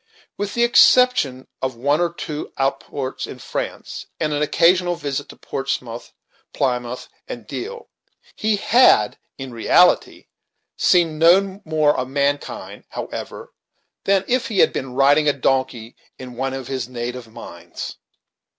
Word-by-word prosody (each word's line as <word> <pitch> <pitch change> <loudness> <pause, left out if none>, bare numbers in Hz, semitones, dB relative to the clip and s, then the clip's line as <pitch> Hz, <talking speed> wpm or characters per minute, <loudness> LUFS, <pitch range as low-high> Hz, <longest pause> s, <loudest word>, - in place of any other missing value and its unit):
With 205 0 -4
the 235 - +3
exception 240 - +4
of 130 -2 -2
one 145 +7 +1
or 175 -2 +1
two 155 -3 -6
outports 135 0 -3
in - - -9
France, - - -6
and 150 -1 0
an 145 - -1
occasional 175 +3 +3
visit 145 -2 -4
to - - -11
Portsmouth, 125 -3 -5 0.4
Plymouth, 125 -2 -2 0.2
and 120 -3 -7
Deal, 455 - -7 0.5
he 215 0 +1
had 205 - +4 0.2
in 135 -2 -7
reality 175 +10 +3 0.5
seen 165 -4 +2
no 190 +4 +4
more 155 -2 +2
of 130 - -2
mankind, 140 +1 -2
however, - - -7 0.5
than 195 -1 +2
if 255 0 +1
he 215 - -4
had - - +4
been 130 -1 -5
riding 145 +2 +4
a - - +2
donkey 130 -4 -1 0.2
in 125 -1 -9
one 135 +2 -2
of 135 -2 -6
his 130 -3 -4
native 120 -1 -6
mines. - - -9
140 Hz, 140 wpm, -21 LUFS, 130-175 Hz, 0.5 s, exception